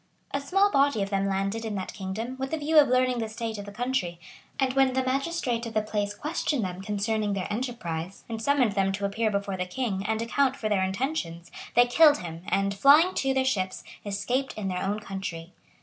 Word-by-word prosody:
A 280 - -1
small 390 +8 +3
body 275 - +3
of 195 - -5
them 195 0 +1
landed 195 +3 -1
in 220 -2 -3
that 190 -1 -4
kingdom, 215 +5 -4
with 265 0 -3
a - - +1
view 305 +1 +4
of 290 - +6
learning 255 -1 +2
the 225 -1 -2
state 220 -1 -4
of 200 - -6
the 205 - -8
country; 215 -6 -2 0.4
and 265 -2 +2
when 270 -1 +3
the 260 0 +1
magistrate 260 -2 -1
of 225 - -8
the 215 - +2
place 205 -1 -2
questioned 295 - -1
them 180 0 -5
concerning 210 +1 -1
their 190 -2 -2
enterprise, 195 -7 -4
and 225 -1 -5
summoned 265 -3 +3
them 195 -1 +1
to 200 +1 -2
appear 220 +3 0
before 200 -2 -2
the 180 0 -2
king, 195 -1 -2
and 220 0 0
account 260 +3 +1
for 220 -6 -3
their 205 -2 +2
intentions, 190 - -3 0.2
they 245 +1 +7
killed 295 +4 +6
him, 165 -1 -7
and, 195 0 +1
flying 295 - +6
to, 270 - 0
their 265 0 +1
ships, 190 -8 -1 0.2
escaped 230 +7 -2
into 200 -3 -2
their 180 - -2
own 205 +2 -1
country. 185 -4 -6
220 Hz, 215 wpm, -27 LUFS, 195-260 Hz, 0.4 s, they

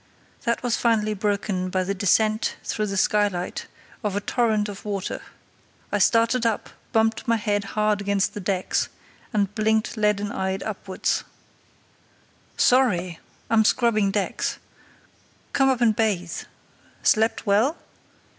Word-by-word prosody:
That 235 +1 0
was 245 -2 +1
finally 215 -2 +2
broken 200 -2 -1
by 185 0 0
the 195 +2 -1
descent 215 +3 +2
through 215 -1 -2
the 195 -1 -3
skylight 200 -3 0 0.4
of 205 -2 -1
a - - +1
torrent 215 -1 +1
of 200 -2 -8
water. 200 -2 -3 0.7
I - - +1
started 230 +1 +3
up, 230 -2 -1 0.2
bumped 225 +1 +1
my 230 - +4
head 205 -2 0
hard 210 -1 +2
against 200 -1 0
the - - -5
decks, 185 -1 -1 0.4
and 205 -3 0
blinked 220 +1 +1
leaden 210 -1 +1
eyed 190 0 -2
upwards. 195 -3 -2 1.3
"Sorry! 185 -10 +3 0.3
I'm 225 -1 +4
scrubbing 215 -3 +3
decks. 200 0 -1 1.0
Come 270 -1 +4
up 255 -2 +1
and 225 -3 +4
bathe. 195 -6 -1 0.6
Slept 220 +2 +2
well?" 220 +10 +3
210 Hz, 130 wpm, -24 LUFS, 200-225 Hz, 1.3 s, my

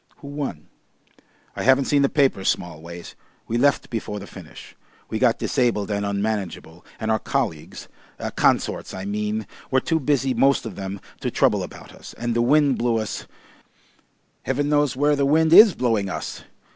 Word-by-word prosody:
"Who 140 - -10
won?" 140 - -5 0.9
"I - - -4
haven't 130 +1 +4
seen 145 -1 +2
the 140 - +3
papers, 135 -9 +2
Smallways. 85 0 -5 0.3
We 120 +1 -1
left 140 +2 +2
before 110 -2 -4
the 100 - -9
finish. - - -12 0.4
We 110 - -1
got 120 -2 +3
disabled 115 -6 0
and 100 0 -1
unmanageable, 100 -4 -3 0.2
and 110 -1 -1
our 110 - +2
colleagues 100 - -3 0.5
consorts - - +1
I 95 0 -6
mean 105 +1 -2 0.2
were 130 - +3
too 160 +4 0
busy 135 -2 +1
most 135 +3 +2
of 110 -5 -6
them 95 0 -5 0.2
to - - -2
trouble - - +2
about - - -9
us, - - -12
and 120 0 -2
the 120 - +2
wind 140 +2 +3
blew 120 -1 +1
us 110 -1 -4 1.1
Heaven 145 +2 -1
knows 145 -3 +2
where 145 +2 +2
the 140 - 0
wind 160 +3 +3
IS 210 +1 +9
blowing 115 -6 0
us. - - -6
120 Hz, 170 wpm, -23 LUFS, 100-140 Hz, 1.1 s, IS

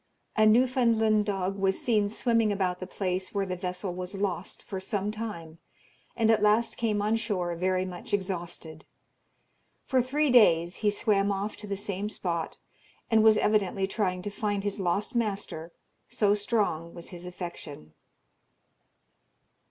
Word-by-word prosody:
A 215 -1 +5
Newfoundland 225 -3 +3
dog 195 -1 -1
was 195 0 +1
seen 210 -4 +2
swimming 230 0 +1
about 185 -3 -1
the 185 - -6
place 185 0 -3
where 200 -1 +1
the 185 -1 -3
vessel 180 +1 -4
was 180 +2 -5
lost 195 -2 -3
for 190 - -5
some 200 +1 -2
time, 170 -8 -6 0.6
and 225 -1 +3
at 220 - +3
last 210 +3 +3
came 210 -3 0
on 215 +2 +2
shore 185 -6 -2
very 185 +1 0
much 180 -1 -8
exhausted. 175 -5 -4 1.0
For 260 -1 +2
three 280 +3 +1
days 175 -8 +5
he 210 - +2
swam 205 -1 +1
off 200 +2 -2
to 210 - -9
the 200 -1 -3
same 200 +1 -3
spot, 170 -5 -3 0.5
and 220 -1 +5
was 220 -1 +6
evidently 200 -3 +2
trying 185 -3 -1
to 205 - -4
find 205 -1 -2
his 205 0 -3
lost 195 +3 -1
master, 200 -8 -2 0.4
so 205 -1 +2
strong 205 -6 -1
was 170 - -8
his 180 0 -9
affection. 170 - -8
200 Hz, 150 wpm, -28 LUFS, 180-215 Hz, 1.0 s, was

